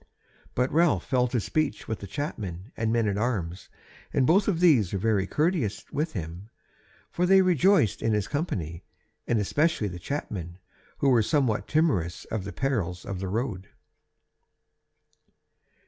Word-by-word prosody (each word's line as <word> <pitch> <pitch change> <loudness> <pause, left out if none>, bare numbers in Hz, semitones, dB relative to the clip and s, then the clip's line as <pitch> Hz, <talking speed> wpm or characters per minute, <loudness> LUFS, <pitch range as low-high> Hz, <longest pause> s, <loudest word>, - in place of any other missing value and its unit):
But 125 +1 +1
Ralph 165 +1 +3
fell 125 -2 +2
to 120 0 0
speech 155 +7 -1
with 110 - -3
the 100 - -8
chapmen 100 - -5
and 110 0 -1
men 115 -1 +2
at 100 0 0
arms; 100 -7 -2 0.4
and 135 - +2
both 195 +8 +4
of 185 -6 +1
these 140 - +4
were - - +1
very 100 -1 +1
courteous 150 - 0
with 155 +3 -2
him; 90 +1 -6 0.6
for 180 +1 0
they 190 0 +6
rejoiced 180 - +3
in 115 - +1
his 105 -1 0
company, 90 - -3 0.4
and 120 - +2
especially 145 - +1
the 90 -1 -7
chapmen, 90 - -5 0.4
who 140 - +2
were 120 -3 +5
somewhat 110 -4 +1
timorous 135 - +1
of 110 -4 -2
the 100 - -5
perils 100 -11 -2
of 95 -2 -4
the 95 - -3
road. 100 -3 -3
115 Hz, 155 wpm, -27 LUFS, 95-150 Hz, 0.6 s, they